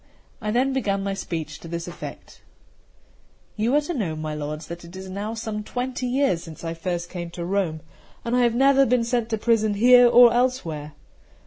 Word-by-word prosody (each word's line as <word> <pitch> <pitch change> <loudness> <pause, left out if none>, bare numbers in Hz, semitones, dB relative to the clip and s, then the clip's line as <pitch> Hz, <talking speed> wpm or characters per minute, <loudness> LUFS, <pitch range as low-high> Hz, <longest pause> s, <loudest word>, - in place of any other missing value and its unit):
I 210 - -3
then 255 +5 +1
began 200 -7 -1
my 195 0 -2
speech, 160 -5 -5
to - - -10
this 170 +1 -5
effect: 175 - -9 1.1
"You 225 +5 +1
are 295 - +4
to 300 +4 -4
know, 195 - -2
my 155 0 -4
lords, 150 +1 -5
that 170 0 -8
it 170 +2 -12
is 190 0 -8
now 205 +4 -4
some 220 -2 -4
twenty 250 +2 -3
years 250 -9 +1
since 165 -2 -11
I 165 0 -3
first 175 +1 -3
came 175 -1 -6
to 170 0 -6
Rome, 180 -4 -1 0.4
and 235 +1 0
I 250 - +3
have 235 -1 +2
never 275 +1 +5
been 245 0 +2
sent 235 -1 -1
to 220 - 0
prison 220 -2 +2
here 245 +3 +7
or 240 -1 +7
elsewhere." 170 - -1
210 Hz, 200 wpm, -24 LUFS, 170-245 Hz, 1.1 s, here